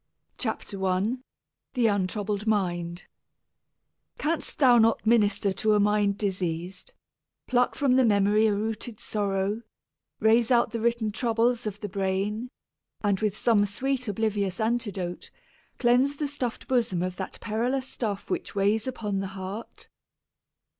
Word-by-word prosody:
THE -, -, -10 dB
CURE 220 Hz, -3 st, +1 dB
BY -, -, -17 dB
FAITH 200 Hz, -, -8 dB, 0.2 s
88 205 Hz, +6 st, 0 dB
I -, -, -5 dB, 0.6 s
THE 240 Hz, -2 st, +3 dB
UNTROUBLED 205 Hz, +1 st, -1 dB
MIND 175 Hz, -4 st, -1 dB, 1.1 s
Canst 320 Hz, +1 st, -2 dB
thou 250 Hz, -5 st, +6 dB
not 225 Hz, 0 st, +3 dB
minister 210 Hz, -3 st, +3 dB
to 215 Hz, +2 st, +2 dB
a -, -, +3 dB
mind 205 Hz, -1 st, +2 dB
diseas'd, 180 Hz, -2 st, -3 dB, 0.5 s
Pluck 245 Hz, 0 st, +2 dB
from 265 Hz, -3 st, +3 dB
the 260 Hz, -, +5 dB
memory 210 Hz, 0 st, +4 dB
a 210 Hz, -, +2 dB
rooted 220 Hz, +1 st, -4 dB
sorrow, 205 Hz, -1 st, -1 dB, 0.6 s
Raze 225 Hz, +2 st, +4 dB
out 240 Hz, -2 st, +3 dB
the 230 Hz, -, -3 dB
written 230 Hz, -1 st, 0 dB
troubles 230 Hz, +1 st, +1 dB
of 210 Hz, 0 st, -5 dB
the 205 Hz, -, -3 dB
brain, 200 Hz, +4 st, -2 dB, 0.5 s
And 200 Hz, -2 st, +1 dB
with 215 Hz, -1 st, -1 dB
some 225 Hz, -4 st, +3 dB
sweet 255 Hz, +4 st, -2 dB
oblivious 205 Hz, -1 st, -1 dB
antidote 205 Hz, -6 st, -2 dB, 0.5 s
Cleanse 255 Hz, +3 st, +3 dB
the 295 Hz, 0 st, -2 dB
stuff'd 265 Hz, -4 st, -4 dB
bosom 230 Hz, -9 st, +1 dB
of 180 Hz, 0 st, -3 dB
that 190 Hz, -, -5 dB
perilous 245 Hz, +4 st, -1 dB
stuff 210 Hz, -7 st, -4 dB
Which -, -, -3 dB
weighs 205 Hz, +4 st, +1 dB
upon 210 Hz, -6 st, -2 dB
the 195 Hz, -, -2 dB
heart? 190 Hz, +4 st, -7 dB
215 Hz, 145 wpm, -27 LUFS, 200-235 Hz, 1.1 s, thou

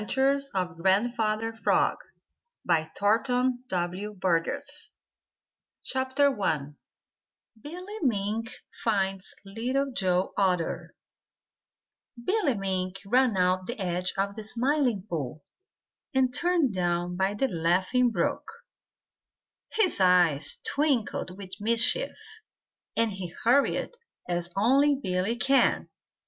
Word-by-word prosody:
CROAKED 275 Hz, +1 st, +2 dB, 0.3 s
GRANDFATHER 215 Hz, +3 st, +1 dB
FROG -, -, +2 dB, 0.7 s
THE 175 Hz, -, +3 dB
ADVENTURES 225 Hz, +10 st, +1 dB, 0.2 s
OF 185 Hz, +3 st, -3 dB
GRANDFATHER 260 Hz, +9 st, -3 dB
FROG 205 Hz, -, -8 dB
I 150 Hz, -5 st, -1 dB, 0.9 s
BILLY 365 Hz, -, -8 dB
MINK 225 Hz, -3 st, -1 dB, 0.3 s
FINDS 195 Hz, -3 st, -1 dB
LITTLE 255 Hz, +7 st, -2 dB
JOE 185 Hz, -3 st, 0 dB
OTTER 180 Hz, -4 st, -1 dB, 1.3 s
Billy 375 Hz, -, +1 dB
Mink 190 Hz, -2 st, -2 dB
ran 245 Hz, 0 st, +3 dB
around 185 Hz, 0 st, +1 dB
the 240 Hz, -1 st, -5 dB
edge 180 Hz, -1 st, -1 dB
of 200 Hz, +1 st, 0 dB
the 220 Hz, -, -7 dB
Smiling 245 Hz, -1 st, 0 dB
Pool 150 Hz, -, -4 dB, 0.7 s
and 260 Hz, -1 st, +2 dB
turned 340 Hz, -, +1 dB
down 175 Hz, -1 st, -1 dB
by 190 Hz, +2 st, 0 dB
the 270 Hz, +6 st, +1 dB
Laughing 185 Hz, +7 st, +2 dB
Brook. 225 Hz, -, -2 dB, 1.2 s
His 435 Hz, -, +2 dB
eyes 175 Hz, -6 st, +3 dB
twinkled 265 Hz, -10 st, -1 dB
with 195 Hz, -2 st, -10 dB
mischief, 230 Hz, -, +3 dB, 0.8 s
and 230 Hz, -1 st, +2 dB
he 190 Hz, -3 st, -6 dB
hurried 255 Hz, +5 st, +2 dB, 0.4 s
as 175 Hz, -1 st, -2 dB
only 275 Hz, +7 st, +4 dB
Billy 190 Hz, -3 st, -1 dB
can. 270 Hz, +3 st, +2 dB
210 Hz, 100 wpm, -27 LUFS, 185-260 Hz, 1.3 s, only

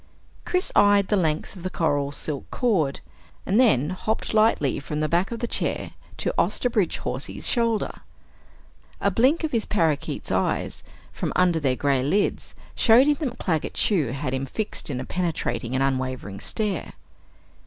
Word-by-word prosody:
Chris 365 Hz, 0 st, 0 dB
eyed 205 Hz, -1 st, +5 dB
the 210 Hz, -, +3 dB
length 160 Hz, -1 st, -1 dB
of 185 Hz, -, -10 dB
the 185 Hz, -, -3 dB
coral 145 Hz, -5 st, 0 dB
silk 145 Hz, 0 st, -4 dB
cord, 180 Hz, -, 0 dB, 0.4 s
and 200 Hz, +5 st, +2 dB
then 170 Hz, -, +4 dB
hopped 215 Hz, +5 st, -2 dB
lightly 215 Hz, -, +3 dB
from 150 Hz, +2 st, -4 dB
the 155 Hz, -, +1 dB
back 175 Hz, +4 st, +1 dB
of 235 Hz, -, -5 dB
the 240 Hz, -, -1 dB
chair -, -, -2 dB, 0.3 s
to -, -, -1 dB
Osterbridge 230 Hz, -8 st, +1 dB
Hawsey's 130 Hz, +2 st, -3 dB
shoulder. 230 Hz, -3 st, 0 dB, 1.0 s
A -, -, +1 dB
blink 270 Hz, +8 st, +3 dB
of 315 Hz, -, -1 dB
his 230 Hz, -3 st, 0 dB
parakeet's 160 Hz, -8 st, -1 dB
eyes, -, -, -1 dB, 0.3 s
from -, -, -3 dB
under 180 Hz, -2 st, +3 dB
their 135 Hz, -4 st, +1 dB
gray 140 Hz, -1 st, +1 dB
lids, 190 Hz, +10 st, 0 dB, 0.2 s
showed 235 Hz, +3 st, +6 dB
him 295 Hz, -, +4 dB
that 270 Hz, -7 st, -3 dB
Claggett 160 Hz, -5 st, -1 dB
Chew 175 Hz, -, +2 dB
had 130 Hz, +2 st, -3 dB
him 135 Hz, +1 st, -2 dB
fixed 215 Hz, -, -4 dB
in 130 Hz, -3 st, -2 dB
a 130 Hz, -, -5 dB
penetrating 130 Hz, -9 st, -2 dB
and 135 Hz, -, +2 dB
unwavering 130 Hz, -7 st, -2 dB
stare. 205 Hz, -6 st, -3 dB
170 Hz, 165 wpm, -24 LUFS, 140-220 Hz, 1.0 s, showed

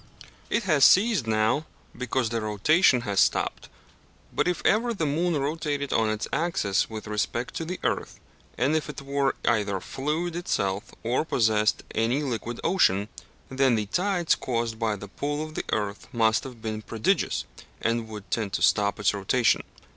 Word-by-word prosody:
It 230 Hz, -, +1 dB
has 155 Hz, -7 st, +3 dB
ceased 195 Hz, -, +5 dB
now, 110 Hz, +8 st, +1 dB, 0.3 s
because 125 Hz, -1 st, -1 dB
the 115 Hz, 0 st, -2 dB
rotation 125 Hz, -, +3 dB
has 100 Hz, -4 st, -1 dB
stopped, -, -, +1 dB, 0.6 s
but -, -, +1 dB
if 180 Hz, -, -1 dB
ever 230 Hz, +2 st, +2 dB
the 165 Hz, -, -1 dB
moon 165 Hz, +3 st, +1 dB
rotated 145 Hz, -1 st, -2 dB
on 110 Hz, -1 st, +2 dB
its 110 Hz, 0 st, -2 dB
axis 155 Hz, -, +1 dB
with 110 Hz, -1 st, -7 dB
respect 110 Hz, +3 st, -2 dB
to 165 Hz, -, -3 dB
the 180 Hz, +3 st, -5 dB
earth, -, -, -2 dB, 0.4 s
and 140 Hz, +5 st, +2 dB
if 155 Hz, -1 st, -1 dB
it 150 Hz, -, -6 dB
were 140 Hz, -1 st, 0 dB
either 105 Hz, -4 st, +1 dB
fluid 155 Hz, -, -3 dB
itself 100 Hz, -, -1 dB, 0.2 s
or 120 Hz, +6 st, +1 dB
possessed 110 Hz, -7 st, +2 dB
any 120 Hz, +6 st, +1 dB
liquid 120 Hz, -3 st, -3 dB
ocean, 100 Hz, -, +2 dB, 0.4 s
then 130 Hz, -2 st, +3 dB
the 105 Hz, -1 st, -1 dB
tides 180 Hz, -, +1 dB
caused 115 Hz, -2 st, -2 dB
by 110 Hz, -2 st, 0 dB
the 100 Hz, 0 st, -9 dB
pull 145 Hz, +8 st, -3 dB
of 155 Hz, -, -10 dB
the -, -, -4 dB
earth 105 Hz, -1 st, -2 dB
must 110 Hz, 0 st, +2 dB
have 125 Hz, -4 st, -10 dB
been 110 Hz, -1 st, -3 dB
prodigious, 110 Hz, 0 st, 0 dB, 0.3 s
and 115 Hz, 0 st, 0 dB
would 105 Hz, -2 st, -9 dB
tend 105 Hz, -4 st, -1 dB
to 85 Hz, -, -1 dB
stop 100 Hz, -1 st, +3 dB
its 105 Hz, -, +2 dB
rotation. 105 Hz, +4 st, +2 dB
120 Hz, 170 wpm, -26 LUFS, 110-150 Hz, 0.6 s, ceased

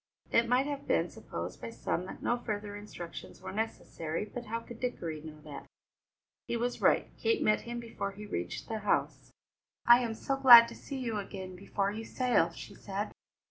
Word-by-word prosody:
It 235 Hz, 0 st, +4 dB
might 250 Hz, +2 st, +4 dB
have 285 Hz, -1 st, -4 dB
been 165 Hz, +1 st, +2 dB
supposed 85 Hz, +2 st, -6 dB
by 115 Hz, -, -5 dB
some 140 Hz, +9 st, -2 dB
that -, -, -9 dB
no 240 Hz, -, +2 dB
further 210 Hz, -3 st, -4 dB
instructions 205 Hz, -5 st, -8 dB
were -, -, -7 dB
necessary, 190 Hz, -5 st, -3 dB
but 240 Hz, +3 st, -7 dB
how 230 Hz, +1 st, -2 dB
could 235 Hz, 0 st, -11 dB
Dickory 170 Hz, -11 st, -3 dB
know 155 Hz, -1 st, -10 dB
that? 145 Hz, -2 st, -9 dB, 0.8 s
He 235 Hz, -, -1 dB
was 245 Hz, +1 st, -2 dB
right. -, -, +3 dB
Kate 450 Hz, -2 st, +2 dB
met 215 Hz, 0 st, +3 dB
him 240 Hz, 0 st, -3 dB
before 225 Hz, -4 st, -4 dB
he 210 Hz, +2 st, -9 dB
reached 85 Hz, -, -4 dB
the 220 Hz, -1 st, -3 dB
house. 210 Hz, -, 0 dB, 0.5 s
"I 240 Hz, +1 st, +9 dB
am 235 Hz, -3 st, -2 dB
so 270 Hz, +4 st, -1 dB
glad 240 Hz, -3 st, +11 dB
to -, -, -9 dB
see 275 Hz, -, -7 dB
you 230 Hz, -5 st, -2 dB
again 190 Hz, -2 st, -7 dB
before 200 Hz, +1 st, -1 dB
you 220 Hz, +2 st, -5 dB
sail," 230 Hz, -8 st, +2 dB
she 170 Hz, -, -10 dB
said. 200 Hz, +1 st, -4 dB
210 Hz, 190 wpm, -31 LUFS, 180-240 Hz, 0.8 s, glad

